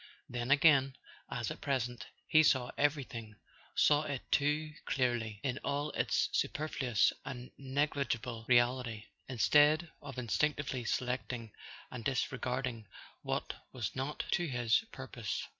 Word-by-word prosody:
Then 120 0 -4
again, 140 -2 +5 0.3
as - - -3
at - - -7
present, 125 -4 -2 0.2
he 155 - +6
saw 130 -5 +3
everything, 130 -7 -1 0.4
saw 145 0 +5
it 145 -4 -4
too 150 +2 +1
clearly, 120 -5 0
in 130 0 -1
all 145 +1 -1
its - - +1
superfluous 130 -7 +1
and 125 -1 -7
negligible 130 -4 -1
reality, 120 -2 +2 0.3
instead 150 +7 +4
of 140 -3 -8
instinctively 130 +1 0
selecting, 125 -2 -2 0.4
and 120 -2 -6
disregarding 125 -2 -2 0.3
what - - -2 0.2
was 120 -6 -3
not 135 +3 -2
to 175 - +1
his 120 - +2
purpose. 125 -6 -5
130 Hz, 120 wpm, -33 LUFS, 120-145 Hz, 0.4 s, he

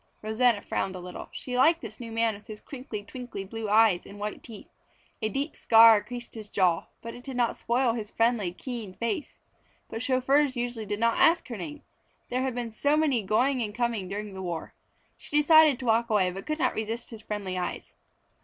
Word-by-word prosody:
Rosanna 220 0 +2
frowned 190 -1 -2
a - - -6
little. 180 0 -8
She 250 - -6
liked 320 +7 +5
this 220 -2 -8
new 230 -2 -7
man 225 0 +1
with 205 0 -13
his 215 -1 -8
crinkly, 250 -6 -7
twinkly 245 -2 -7
blue 225 +1 -5
eyes 215 -4 +4
and 200 - -12
white 210 +1 -5
teeth. 220 -4 -10 0.6
A 215 - 0
deep 275 +8 -3
scar 225 -2 +7
creased 240 +2 -7
his 215 -2 -8
jaw, 180 -5 +1 0.2
but 230 0 -6
it 245 - -11
did 265 -2 -6
not 240 -2 +1
spoil 240 0 +1
his 220 -3 -5
friendly, 225 -6 +1
keen 220 -1 -7
face. 270 +7 -3 0.5
But 225 - -4
chauffeurs 265 +2 +2
usually 240 -3 -3
did 205 +1 -3
not 230 0 +2
ask 335 +1 +4
her 235 - -4
name. 295 +10 -7 0.5
There 250 +1 -1
had 260 -2 -1
been 240 -2 -3
so 285 +7 +1
many 285 -7 +2
going 250 +6 +1
and 210 -2 -4
coming 235 -5 -1
during 205 +1 -5
the 190 - -7
war. 170 -3 -5 0.5
She 295 - -2
decided 310 -2 +6
to 255 - -7
walk 230 +1 +2
away 195 -4 +2
but 195 +2 -8
could 305 0 -1
not - - +1
resist 225 +3 -4
his 225 -2 -9
friendly 205 -4 -4
eyes. 180 -1 -4
230 Hz, 210 wpm, -27 LUFS, 210-250 Hz, 0.6 s, scar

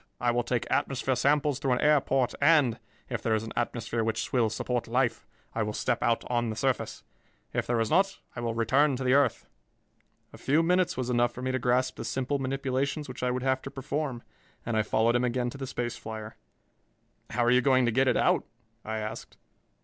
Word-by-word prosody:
I 120 0 +2
will 120 0 +1
take 120 0 -1
atmosphere 135 -2 0
samples 140 +2 +2
through 135 -2 +1
an 125 - 0
air 150 -1 +5
port 130 -2 0
and, 140 -6 +4 0.3
if - - -3
there 110 -1 +1
is 110 - -1
an 115 - -7
atmosphere 120 -1 -1
which 110 0 -2
will 120 -4 +3
support 120 +2 -2
life, 120 0 0 0.3
I 115 - -1
will 105 0 -1
step - - -1
out 115 0 +1
on 120 -1 0
the 110 - -3
surface. 130 +2 -1 0.5
If - - -1
there 120 -1 +1
is 115 -1 0
not, 195 +1 +3 0.2
I - - -5
will 115 -1 -2
return 135 +5 +3
to 130 - -4
the 130 0 +3
earth." 140 -1 +2 0.9
A - - -12
few 150 +4 +2
minutes 180 -1 +2
was 125 -1 -2
enough 120 -1 +2
for 125 - -7
me 130 - 0
to 130 - -1
grasp 125 +1 +1
the - - -5
simple 135 +2 -1
manipulations 135 +2 -2
which 125 - -8
I 125 - +1
would 125 0 -2
have 130 0 +1
to - - -7
perform, 135 -2 -4 0.4
and 115 - -2
I 110 - +3
followed 110 +2 +2
him 120 - +2
again 125 0 0
to 140 - -9
the 135 - -4
space 120 -1 -3
flier. 110 0 -7 0.9
"How 120 - 0
are 120 - +4
you 125 0 +5
going 130 -1 +4
to 120 - +2
get 130 +3 +2
it - - +3
out?" - - +3 0.4
I 110 0 -3
asked. 110 +1 -6
125 Hz, 220 wpm, -28 LUFS, 120-135 Hz, 0.9 s, air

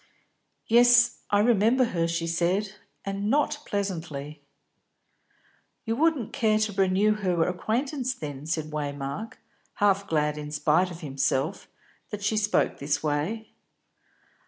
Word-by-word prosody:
"Yes, 240 +1 +5
I 205 0 +3
remember 230 +3 +4
her," 165 -1 +1
she 165 0 -2
said, 180 +5 0 0.3
"and 200 +1 -2
not 295 +2 +1
pleasantly." 160 -7 -4 1.4
"You 225 -1 -1
wouldn't 300 -5 +1
care 215 -2 +2
to 215 -1 0
renew 195 +2 +3
her 180 -6 0
acquaintance 255 - -2
then?" 145 -1 -7
said 155 -1 -2
Waymark, 145 +7 -4 0.4
half 200 -1 +2
glad, 150 -2 0
in 150 0 -6
spite 150 +5 +2
of 175 0 -9
himself, 140 +3 -1 0.4
that 210 -1 -6
she 210 +2 +1
spoke 210 -1 +2
in - - -20
this 145 +2 -2
way. 155 +10 -2
195 Hz, 130 wpm, -26 LUFS, 155-220 Hz, 1.4 s, Yes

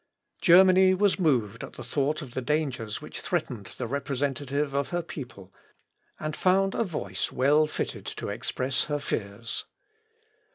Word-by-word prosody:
] - - -41
Germany 185 +1 +7
was 200 0 +2
moved 125 - +1
at - - -8
the 125 - -8
thought 145 +5 0
of 125 -4 -10
the 130 - -2
dangers 130 -6 -1
which - - -8
threatened 105 -5 -2
the 125 - -2
representative 140 +2 -1
of 140 0 0
her 175 0 -1
people, 125 - -9 0.7
and 155 0 -3
found 195 +1 +3
a - - +1
voice 100 - -3
well 145 +4 +4
fitted - - -4
to - - -5
express 130 0 -1
her 145 - -1
fears. 115 -4 -4
140 Hz, 155 wpm, -27 LUFS, 125-155 Hz, 0.7 s, Germany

